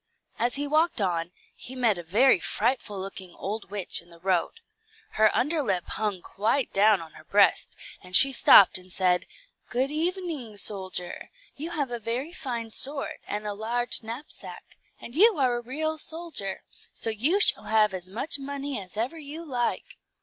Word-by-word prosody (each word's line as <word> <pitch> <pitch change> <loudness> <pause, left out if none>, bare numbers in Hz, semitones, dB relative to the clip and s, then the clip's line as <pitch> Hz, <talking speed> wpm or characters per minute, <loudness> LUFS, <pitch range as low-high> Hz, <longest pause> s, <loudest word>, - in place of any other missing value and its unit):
As 240 +2 +1
he 285 +1 -2
walked 310 +2 +1
on, 175 -3 -1 0.2
he 260 - -9
met 230 -7 +1
a - - -4
very 205 +7 +3
frightful 215 0 -1
looking 190 -2 -8
old 210 +2 -5
witch 200 -2 -2
in 170 - -21
the 170 - -16
road. 180 0 0 0.6
Her 215 0 +4
under 305 +4 0
lip 190 -9 -1
hung 205 -4 -3
quite 230 +6 -1
down 205 -1 +4
on 160 - -14
her - - -15
breast, - - +3 0.3
and 180 0 -1
she 270 +6 +9
stopped 200 -7 +7
and 185 0 -16
said, 180 -1 +1 0.4
"Good 260 +3 0
evening, 320 - -3
soldier; 185 -3 +1 0.3
you 310 +4 -5
have 290 -7 -3
a 240 - -3
very 245 +9 -4
fine 235 -9 -5
sword, 275 +4 0
and 210 +1 -4
a 210 - -3
large 235 +3 -1
knapsack, 235 +7 -9 0.2
and 235 - -10
you 420 +3 +6
are 255 -3 +2
a - - -5
real 310 +6 -3
soldier; 320 - -2 0.3
so 225 - -1
you 280 - +2
shall - - +5
have 215 -2 +3
as 185 -1 -6
much 270 +10 0
money 280 -2 -5
as 185 +2 -12
ever 255 +9 -2
you 310 +3 -8
like." 245 -5 -3
235 Hz, 175 wpm, -26 LUFS, 195-285 Hz, 0.6 s, she